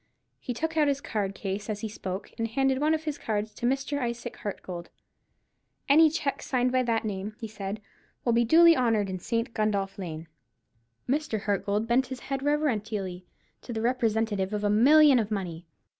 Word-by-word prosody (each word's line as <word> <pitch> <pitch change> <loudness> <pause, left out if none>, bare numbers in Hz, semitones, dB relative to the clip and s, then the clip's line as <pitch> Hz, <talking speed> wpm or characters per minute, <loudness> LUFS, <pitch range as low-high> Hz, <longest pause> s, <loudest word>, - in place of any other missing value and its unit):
He 245 - -5
took 320 +4 -2
out 300 -2 +4
his 280 -1 +1
card 200 -7 -3
case 200 +2 -4
as 210 -1 -3
he 225 - -2
spoke, 190 -2 -6
and 230 - 0
handed 265 +3 +1
one 310 +1 +3
of 315 - -5
his 305 -2 -4
cards 215 -1 -2
to 240 - -2
Mr. 275 +2 -1
Isaac 240 -1 -4
Hartgold. 180 -4 -6 1.0
"Any 315 +3 +7
cheques 295 -3 -3
signed 250 -1 +1
by 255 0 +3
that 230 -2 0
name," 205 0 -4
he 225 - -5
said, 205 -1 -5 0.5
"will 235 - +3
be 235 +1 +4
duly 330 +7 +7
honoured 225 -7 +1
in 185 - -4
St. 230 +5 -2
Gundolph 200 -2 -1
Lane." 165 -3 -6 0.8
Mr. 270 -6 -1
Hartgold 205 +1 0
bent 245 +3 +2
his 255 -1 -7
head 270 -1 -3
reverentially 215 -11 -1 0.3
to - - -8
the 220 -1 -2
representative 220 -5 0
of 210 0 -2
a 205 - +2
million 280 +5 +6
of 215 -2 -1
money. 175 -5 -4
225 Hz, 185 wpm, -27 LUFS, 205-265 Hz, 1.0 s, Any